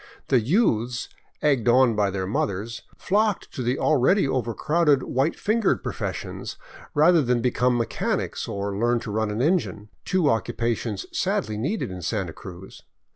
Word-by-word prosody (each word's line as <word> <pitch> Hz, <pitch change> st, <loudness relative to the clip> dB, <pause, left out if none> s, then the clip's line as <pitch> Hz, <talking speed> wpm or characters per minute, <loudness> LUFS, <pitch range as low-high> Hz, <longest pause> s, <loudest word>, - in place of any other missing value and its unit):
The 130 Hz, -, +5 dB
youths, 120 Hz, -, +1 dB, 0.3 s
egged 135 Hz, -6 st, +2 dB
on 125 Hz, -1 st, +5 dB
by 105 Hz, -1 st, +2 dB
their 95 Hz, -1 st, -3 dB
mothers, 105 Hz, +3 st, -2 dB, 0.2 s
flocked 210 Hz, +1 st, 0 dB
to 135 Hz, -, -4 dB
the 125 Hz, +2 st, 0 dB
already 155 Hz, +4 st, +3 dB
overcrowded 135 Hz, +4 st, +1 dB
white 135 Hz, +5 st, 0 dB
fingered 220 Hz, +2 st, +1 dB
professions, -, -, -5 dB, 0.4 s
rather 160 Hz, +3 st, +5 dB
than 125 Hz, -2 st, +1 dB
become 125 Hz, 0 st, +1 dB
mechanics 115 Hz, -1 st, -2 dB
or 100 Hz, 0 st, -3 dB
learn 120 Hz, +3 st, +1 dB
to 105 Hz, -, -6 dB
run 110 Hz, +1 st, 0 dB
an 105 Hz, +4 st, -1 dB
engine, 150 Hz, -, 0 dB
two 185 Hz, -5 st, +1 dB
occupations 115 Hz, -4 st, -1 dB
sadly 105 Hz, 0 st, -1 dB
needed 135 Hz, -, -2 dB
in 90 Hz, -1 st, -7 dB
Santa 95 Hz, -3 st, -2 dB
Cruz. 95 Hz, 0 st, -11 dB
120 Hz, 145 wpm, -24 LUFS, 105-150 Hz, 0.4 s, The